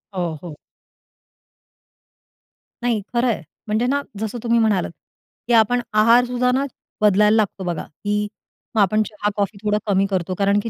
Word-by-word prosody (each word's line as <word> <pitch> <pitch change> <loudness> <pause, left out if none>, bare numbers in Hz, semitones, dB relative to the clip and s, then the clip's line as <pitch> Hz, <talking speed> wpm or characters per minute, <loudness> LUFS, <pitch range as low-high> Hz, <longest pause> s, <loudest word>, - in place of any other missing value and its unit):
हो, 175 -3 -2
हो. 160 -4 -8 2.3
नाही 235 -3 +1
खरं 240 +1 +2
आहे, 230 -7 0 0.3
म्हणजे 215 +3 +1
ना 280 +2 +1 0.2
जसं 220 +2 -3
तुम्ही 235 0 +3
म्हणालात, 205 -6 +1 0.6
की 240 - +1
आपण 235 +2 +4
आहारसुद्धा 245 +3 +4
ना 265 +2 +1 0.4
बदलायला 210 +1 +5
लागतो 205 -3 0
बघा, 175 -3 -3
की 210 +6 -3 0.5
मग 215 - +4
आपण 215 +3 +3
चहा-कॉफी 205 -1 -2
थोडं 210 0 +2
कमी 195 -1 +3
करतो, 185 -1 -1
कारण 200 +1 +2
की 230 - -3
210 Hz, 145 wpm, -21 LUFS, 200-235 Hz, 2.3 s, बदलायला